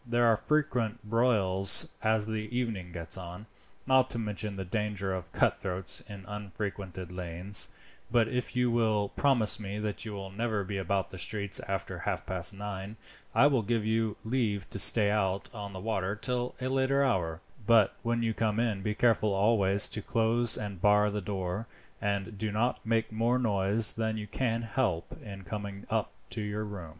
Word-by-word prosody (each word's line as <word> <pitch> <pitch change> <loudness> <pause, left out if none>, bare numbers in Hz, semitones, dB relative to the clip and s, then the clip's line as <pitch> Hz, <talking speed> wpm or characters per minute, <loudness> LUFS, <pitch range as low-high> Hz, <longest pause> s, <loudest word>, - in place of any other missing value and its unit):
There 120 -1 +2
are 115 -1 +5
frequent 125 -5 0
broils 105 -5 +5
as 110 -1 +2
the 110 -1 -3
evening 105 -8 -2
gets 85 +2 -4
on, 90 +3 -8 0.4
not 130 -1 +4
to - - -4
mention 105 -2 -3
the 95 -1 -5
danger 100 -1 -2
of 95 -2 -5
cutthroats 95 -1 0
in 100 -2 -9
unfrequented 100 -3 -5
lanes; 90 +2 -1 0.4
but 115 -1 +3
if 125 +2 -3
you 125 -1 +2
will 110 -3 +2
promise 120 -7 +3
me 100 -1 -5
that 105 -1 -3
you 110 -2 -6
will 95 -1 -6
never 110 0 -1
be 95 +1 -4
about 95 +1 -1
the 95 - -8
streets 100 0 0
after 95 -1 -3
half - - -2
past 90 -1 +1
nine, 100 +1 -6 0.4
I - - +6
will 140 -4 +4
give 110 0 -1
you 110 -1 0
leave 110 -5 0
to 100 - -3
stay 105 0 +4
out 100 -2 0
on 100 -3 -6
the 95 - -7
water 95 -1 -1
till 125 +2 -2
a 130 - -2
later 135 +1 +2
hour; 85 -11 0 0.3
but 110 -4 +5
when 115 0 0
you 115 -1 +1
come 110 0 0
in 115 -4 +1
late - - -9
be 105 0 -1
careful 110 -2 +3
always 100 -1 +3
to 105 - -2
close 115 +2 +2
and 100 -4 -5
bar 105 +1 +4
the 105 0 -2
door, 95 +2 -3 0.3
and 100 0 -2
do 110 0 -1
not 115 +4 0
make 115 0 0
more 115 +3 +1
noise 105 -2 +2
than 110 -1 -1
you 105 - -4
can 115 +2 -1
help 115 -7 -1
in 100 -3 -8
coming 100 +2 -6
up - - 0 0.2
to - - -3
your 105 +1 -3
room." 100 -6 -7
105 Hz, 185 wpm, -30 LUFS, 95-115 Hz, 0.4 s, I